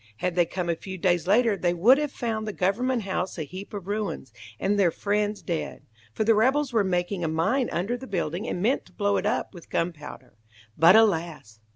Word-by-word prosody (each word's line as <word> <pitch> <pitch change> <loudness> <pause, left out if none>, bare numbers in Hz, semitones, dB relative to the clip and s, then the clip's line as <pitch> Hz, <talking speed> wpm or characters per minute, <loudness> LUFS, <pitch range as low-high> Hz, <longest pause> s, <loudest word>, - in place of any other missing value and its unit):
Had 180 +8 -1
they 175 -1 +2
come 180 -2 -4
a 170 - +1
few 190 +3 -8
days 175 -2 +1
later 220 +2 +4
they 175 -2 0
would 240 +11 +5
have 295 -2 -2
found 220 -4 -3
the 215 - -3
Government 235 +6 0
House 185 -1 -3
a 160 - -2
heap 185 +7 -9
of 200 -4 -6
ruins, 200 - -4 0.3
and 205 +1 +1
their 185 -3 +5
friends 210 +3 -1
dead, 170 -3 -4 0.3
for 165 - -1
the 225 +1 +4
rebels 260 +5 +2
were 220 -3 +3
making 180 0 -1
a - - 0
mine 165 - 0
under 195 +8 -1
the 260 +2 -9
building 175 +1 -3
and 180 - -3
meant 250 +6 +1
to - - -22
blow 205 -1 +1
it - - -1
up - - -1
with 175 -3 -13
gunpowder. 160 - -4 0.4
But 170 +5 +7
alas! 165 - +1
195 Hz, 215 wpm, -26 LUFS, 175-220 Hz, 0.4 s, But